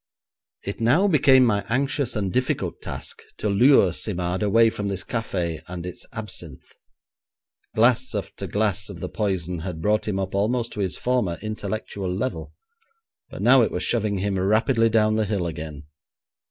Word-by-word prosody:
It 100 +3 -5
now 140 - +4
became 135 -6 +5
my 105 -4 +1
anxious 135 0 0
and 100 -4 -2
difficult 130 0 -1
task - - -6 0.2
to - - -2
lure 100 - +5
Simard 90 -1 -1
away 115 +2 +4
from 105 -2 -4
this 95 -2 -3
café 90 -9 -3
and 90 -1 -6
its 90 - -8
absinthe. - - -7 1.0
Glass 120 +1 +3
after 100 - -4
glass 105 -1 0
of 95 -4 -8
the - - -5
poison 90 -5 -2
had 85 -1 -5
brought 105 +6 +1
him 100 -2 -1
up 95 -1 -3
almost 115 +4 0
to - - -7
his 95 -3 -1
former 120 -9 0
intellectual 105 -2 -4
level, 95 -4 -3 0.8
but - - -7
now - - +7
it - - +2
was - - -3
shoving 105 -4 +1
him 95 0 -1
rapidly 115 +4 +3
down 110 -1 +3
the 110 - +1
hill 100 -3 -1
again. 75 -3 -6
105 Hz, 165 wpm, -24 LUFS, 95-115 Hz, 1.0 s, now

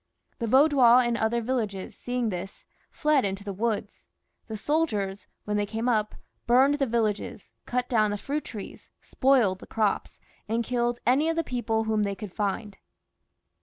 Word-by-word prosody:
The 230 - -2
Vaudois 260 -1 +6
in 240 -1 0
other 230 +1 0
villages 220 -6 -3
seeing 245 -2 -2
this, 185 0 -6 0.2
fled 300 -3 +2
into 195 0 -3
the 200 -1 -5
woods; 210 0 -3 0.4
the 220 -2 -5
soldiers, 205 - -1 0.2
when 210 0 -1
they 205 - +1
came 225 +3 -3
up, 215 -3 +1 0.3
burned 270 +4 +4
the 275 - +1
vil 235 0 +1
lages, 210 -1 -4 0.2
cut 250 0 -1
down 215 -3 +2
the 205 - -2
fruit 285 +7 -3
trees, 210 -4 -9
spoiled 250 -9 +2
the - - -12
crops, 215 -3 -1 0.3
and 230 +1 0
killed 240 0 0
any 275 +6 +3
of 330 - 0
the 330 - 0
people 235 -4 -1
whom 220 -1 0
they 200 -1 -1
could 205 -3 -8
find. 205 0 -3
225 Hz, 170 wpm, -27 LUFS, 205-250 Hz, 0.4 s, Vaudois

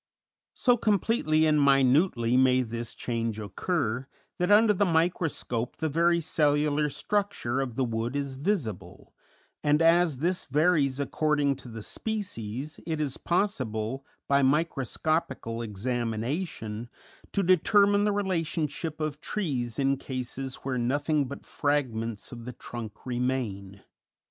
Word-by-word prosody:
So 245 -1 +3
completely 200 -7 +2
and 150 -2 +4
minutely 135 -2 +4
may 130 0 +4
this 115 0 -5
change 115 -2 -2
occur 115 - -2 0.3
that 180 +1 +1
under 210 +1 +6
the 205 - +2
microscope 160 - 0
the 160 - -1
very 170 +3 +3
cellular 150 -1 +2
structure 150 -4 -1
of 125 -4 -4
the 135 - +1
wood 115 +1 -2
is 140 -1 -2
visible, 135 - -3 0.5
and 150 0 +3
as 165 -2 +4
this 175 +6 -1
varies 145 -2 +2
according 145 -1 +1
to - - -11
the 115 -2 -7
species, 150 - -4
it 160 -2 -1
is 145 -3 -1
possible, 130 - -1 0.2
by 140 0 +4
microscopical 140 -3 0
examination, 115 - -3 0.4
to 200 - +1
determine 200 +3 +4
the 210 - +2
relationship 165 -5 -2
of 155 -1 -3
trees 130 - -2
in 135 0 +2
cases 130 0 -5
where 130 -2 -1
nothing 145 +4 +1
but 140 - -8
fragments 115 -7 -1
of 120 -2 -9
the 125 - -6
trunk 115 -4 -8
remain. 120 -6 -2
140 Hz, 125 wpm, -28 LUFS, 120-165 Hz, 0.5 s, under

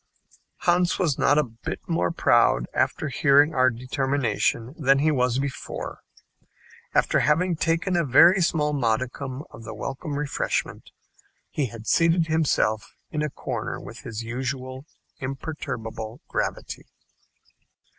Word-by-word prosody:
Hans 175 0 +2
was 165 -8 0
not 145 - +4
a 150 - +4
bit 115 -3 -6
more 85 +1 +1
proud - - +3
after 155 - 0
hearing 145 +3 +4
our 130 0 +4
determination 130 -1 -1
than 135 -4 +3
he 155 +3 +3
was 125 -3 +1
before. 135 -1 -4 1.0
After - - +3
having 170 +4 +2
taken 165 +3 0
a 170 - +3
very 170 +7 +6
small 150 -3 +1
modicum 130 +2 -1
of 115 - -11
the 110 0 -7
welcome 140 +2 -5
refreshment, 145 -1 -2 0.6
he 145 -4 -1
had 115 0 -10
seated 165 +3 +3
himself 155 -9 0 0.2
in 155 - -2
a 150 - 0
corner - - -4
with - - -10
his 115 -1 -6
usual 130 +3 -4 0.3
imperturbable 130 -5 -5
gravity. - - -3
135 Hz, 125 wpm, -25 LUFS, 125-155 Hz, 1.0 s, very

